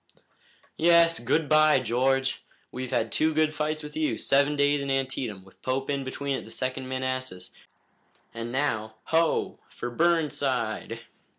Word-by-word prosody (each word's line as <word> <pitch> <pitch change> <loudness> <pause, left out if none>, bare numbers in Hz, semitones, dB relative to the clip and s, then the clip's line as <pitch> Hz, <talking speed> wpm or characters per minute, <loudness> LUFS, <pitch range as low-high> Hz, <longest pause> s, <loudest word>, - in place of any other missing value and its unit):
"Yes, 170 0 +5
good 145 +6 0
bye, 155 0 +5
George! 130 +2 0 0.3
We've 130 0 -5
had 115 -1 0
two 155 0 +1
good 155 0 +2
fights 155 0 -2
with 150 0 -9
you, 155 -1 0
Seven 140 +2 +2
Days 145 0 +2
and 140 - -4
Antietam, 130 -7 -2
with 95 - -21
Pope 135 +2 -2
in 140 -1 -1
between 140 +1 -3
at - - -5
the - - -13
Second 130 +3 -3
Manassas, 130 -7 -3 0.8
and 115 +1 -5
now, 110 -5 -1
ho! 165 0 +1
for 120 - -6
Burnside!" 135 -8 0
135 Hz, 150 wpm, -27 LUFS, 125-155 Hz, 0.8 s, Yes